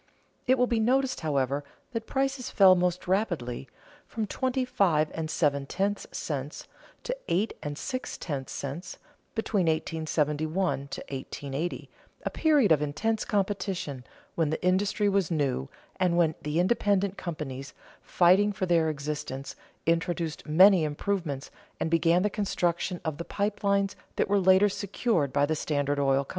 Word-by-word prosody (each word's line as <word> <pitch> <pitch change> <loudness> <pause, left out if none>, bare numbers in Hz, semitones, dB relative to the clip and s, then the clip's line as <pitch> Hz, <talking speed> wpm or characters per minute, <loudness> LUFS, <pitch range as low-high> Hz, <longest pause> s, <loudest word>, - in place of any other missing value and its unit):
It 260 +1 +5
will 250 - +4
be 235 -2 0
noticed, 260 +4 +2
however, 140 -2 0 0.3
that 230 -2 -4
prices 270 -1 -1
fell 190 -2 +7
most 180 0 0
rapidly 175 - -1 0.4
(from 220 -2 -3
twenty 260 +4 -1
five 160 -10 +2
and 160 -1 -3
seven 145 -3 +1
tenths 200 +4 -1
cents 145 -1 -5 0.4
to - - -2
eight 195 +6 +1
and 145 -1 -5
six 255 +5 -4
tenths 140 -5 -4
cents) 145 +6 -5 0.4
between 210 -5 0
1871 155 0 0
to - - -6
1880, 140 +4 -5 0.4
a - - +1
period 295 - +3
of 150 -2 +5
intense 210 +10 -1
competition, 190 - -2 0.3
when 165 -3 +1
the 160 +4 -3
industry 200 +3 +2
was 195 -4 +2
new, 140 - -1 0.3
and 180 -2 +2
when 165 -2 +3
the 150 +2 -1
independent 200 0 +2
companies, 140 -7 -6 0.3
fighting 185 +4 +4
for 195 -2 -2
their 165 -3 +3
existence, 145 -2 -4 0.3
introduced 165 -1 -1
many 185 +3 +7
improvements 150 -2 -2 0.3
and 160 - -1
began 170 +2 +3
the 210 - +2
construction 180 -3 -1
of 160 -1 -3
the - - -2
pipe 205 +4 -2
lines 200 0 +2 0.2
that - - +1
were 200 0 +3
later 190 +2 +5
secured 200 - 0
by 140 +1 +3
the 155 +2 0
Standard 145 -2 -1
Oil 135 0 +2
Co. - - -27
175 Hz, 150 wpm, -28 LUFS, 150-200 Hz, 0.4 s, fell